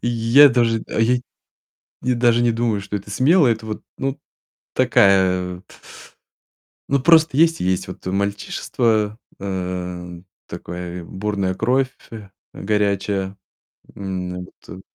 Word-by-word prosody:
Я 120 +4 +5
даже, 115 -2 +1
а, - - -2
я 115 +2 +3 0.9
и 125 +1 +1
даже 120 -1 +3
не 120 -1 +3
думаю, 115 -3 -1
что 100 +1 -5
это 100 +1 -6
смело. 150 - +4
Это 115 -1 0
вот, 110 -1 -6
ну, 135 +1 -3 0.6
такая 90 -2 +3
от 90 - -20 1.2
ну 140 0 +2
просто 160 0 +5
есть 165 +2 +3
и - - -1
есть, 95 0 -1
вот, 90 - -10
э, - - -1
мальчишество, 105 +2 -1 0.2
э, 90 -2 -5 0.2
такое, 90 0 -7
бурная 95 0 -2
кровь 125 +6 +1 0.2
фь 110 -3 -9 0.2
горячая. 100 -1 -1 0.6
М, 90 -2 -5 0.2
вот. 95 - -10
105 Hz, 130 wpm, -21 LUFS, 95-120 Hz, 1.2 s, Я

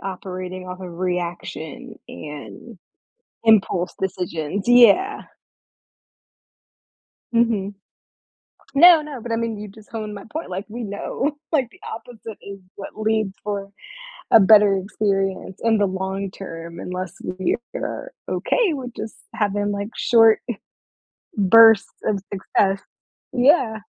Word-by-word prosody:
operating 185 -1 -6
off 180 +1 -7
of 175 -2 -8
reaction 175 -4 -4
and 150 - -10 0.7
impulse 195 -5 +3
decisions, 180 0 -3
yeah. 245 - +5 2.1
Mhm. 225 -4 +1 1.0
No, 335 +2 +8
no, 290 -5 -8
but 235 +1 -6
I 225 - +1
mean 230 -1 -2
you 210 0 -7
just 210 +2 -16
honed 215 -2 -5
my 200 -1 -8
point, 320 +2 -5
like, 190 +3 -4
we 235 +3 -6
know, 265 +8 -3 0.2
like, 265 -6 +2
the - - -20
opposite 225 -1 -9
is 200 0 -9 0.2
what 195 - -9
leads 215 -2 0
for 200 -1 -4 0.6
a 225 - +9
better 210 -1 +6
experience 195 -1 -2
in 225 -1 +3
the 205 - +3
long 190 +1 -3
term 170 -3 -9
unless 180 -1 -5
we 185 0 -1 0.2
are - - -5 0.2
okay 420 -10 +1
with 250 -4 -6
just 220 - -6 0.2
having, 205 -2 0
like, 200 +1 -3
short 225 -2 +5 1.0
bursts 225 +2 +7 0.2
of 205 -2 +1
success, 195 0 +1 0.5
yeah. 250 -3 +3
205 Hz, 125 wpm, -22 LUFS, 190-225 Hz, 2.1 s, a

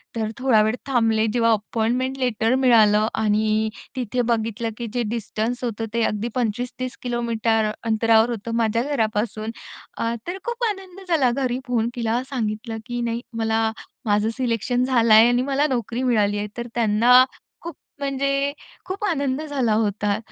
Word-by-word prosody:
तर 220 -1 -2
थोडा 245 -4 +4
वेळ 220 +2 +1
थांबले. 225 -4 +2
जेव्हा 230 -1 +3
अपॉइंटमेंट 230 +5 -1
लेटर 245 -2 +1
मिळालं 220 -5 +5
आणि 215 +1 +1 0.3
तिथे 250 -1 -1
बघितलं, 230 -1 -1
की 235 -1 -4
जे 245 -1 0
डिस्टन्स 230 +2 -3
होतं 225 -2 -2
ते 235 - +1
अगदी 210 +2 -1
25-30 245 +2 -3
किलोमीटर 230 -3 0
अंतरावर 225 +1 +3
होतं 230 0 -4
माझ्या 230 +1 +1
घरापासून. 220 -5 -1 0.5
अ, 230 0 -1
तर 365 +2 -3
खूप 475 0 -3
आनंद 385 -2 -7
झाला. 290 -8 +3
घरी 255 -1 -1
फोन 235 -2 +1
केला. 235 0 -1
सांगितलं 225 -3 -3
की 240 0 -4
नाही, 235 0 -2 0.2
मला 225 0 +1 0.3
"माझं 210 0 +2
सिलेक्शन 245 0 0
झालाय 230 -3 +6
आणि 245 0 +2
मला 280 +2 +1
नोकरी 240 -2 -2
मिळाली 210 -5 +2
आहे." 205 0 -2
तर 235 - -4
त्यांना 235 +3 +5 0.4
खूप 335 -3 -7 0.2
म्हणजे, 275 0 0 0.3
खूप 380 +2 -5
आनंद 285 -6 0
झाला 275 -7 0
होता. 210 -1 0
235 Hz, 150 wpm, -23 LUFS, 220-255 Hz, 0.5 s, झालाय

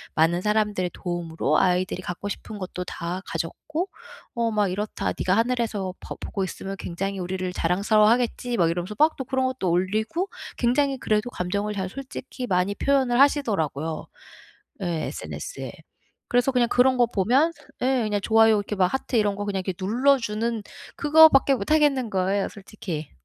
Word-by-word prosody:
많은 165 +2 +3
사람들 210 -3 +1
도움으로 165 -4 -1
아이들이 185 0 +1
갖고 185 +2 -5
싶은 210 +1 -6
것도 180 -1 -5
다 175 +2 -4
가졌고 300 - -4 0.5
어 235 -1 +1
막 210 -2 +1
이렇다. 205 +4 -3
네가 185 - +1
하늘에서 225 -5 0
봐 - - -8
보고 195 - -3
있으면 195 +2 -6
굉장히 195 +3 -4
우리를 185 0 -3
자랑스러워하겠지." 220 +6 +2
막 170 -4 +3
이러면서 180 +5 -4
막 310 +1 +4
또 265 - -4
그런 260 +1 0
것도 255 -8 -2
올리고 215 - 0 0.3
굉장히 270 +3 +2
그래도 215 +2 0
감정을 200 +3 -2
잘 190 -2 -2
솔직히 260 +1 -7
많이 185 +1 +1
표현을 260 -2 +2
하시더라고요. 165 - +1 0.8
예 - - -1 0.2
SNS에. - - -6 0.6
그래서 245 +2 +2
그냥 245 -2 +2
그런 255 +1 +4
거 240 - +5
보면 245 - +2 0.3
예 260 -1 +2
그냥 210 -1 0
좋아요 225 +1 +5
이렇게 205 0 -3
막 185 -1 +4
하트 265 -1 -2
이런 210 -2 +2
거 205 - -3
그냥 195 -2 -2 0.2
눌러주는 230 0 +1 0.3
그거밖에 295 -2 +6
못 240 +2 -2
하겠는 285 -6 +3
거예요 195 +1 0
솔직히. 190 -6 -7
210 Hz, 365 characters per minute, -25 LUFS, 185-250 Hz, 0.8 s, 그거밖에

